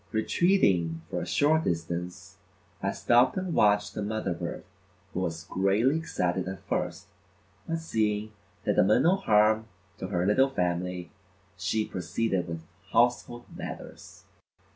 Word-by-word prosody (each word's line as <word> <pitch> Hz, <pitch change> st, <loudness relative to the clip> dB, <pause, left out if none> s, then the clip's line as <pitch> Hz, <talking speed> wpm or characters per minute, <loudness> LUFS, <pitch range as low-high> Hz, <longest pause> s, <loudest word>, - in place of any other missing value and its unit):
Retreating 100 Hz, -, +2 dB
for -, -, -2 dB
a -, -, -5 dB
short 155 Hz, +2 st, +3 dB
distance, 90 Hz, +4 st, -4 dB, 0.4 s
I -, -, 0 dB
stopped 120 Hz, +8 st, +3 dB
and 185 Hz, -2 st, -2 dB
watched 105 Hz, -3 st, +3 dB
the 105 Hz, -, -4 dB
mother 105 Hz, -2 st, -2 dB
bird 85 Hz, -, -5 dB, 0.5 s
who -, -, -2 dB
was 80 Hz, -3 st, -3 dB
greatly 100 Hz, -, +2 dB
excited 95 Hz, -, -1 dB
at 95 Hz, -1 st, -7 dB
first, -, -, -2 dB, 0.6 s
but 165 Hz, -, -1 dB
seeing 110 Hz, -9 st, -1 dB, 0.3 s
that -, -, +1 dB
I -, -, +8 dB
meant 110 Hz, +6 st, +4 dB
no 180 Hz, +5 st, +4 dB
harm 110 Hz, -, +3 dB, 0.3 s
to 95 Hz, -, -4 dB
her 90 Hz, -2 st, 0 dB
little 130 Hz, +7 st, +4 dB
family, 90 Hz, -4 st, -2 dB, 0.4 s
she 100 Hz, +3 st, -1 dB
proceeded 95 Hz, +1 st, -2 dB
with 80 Hz, -1 st, -5 dB, 0.3 s
household 120 Hz, 0 st, +1 dB
matters. -, -, -9 dB
105 Hz, 140 wpm, -28 LUFS, 90-120 Hz, 0.6 s, I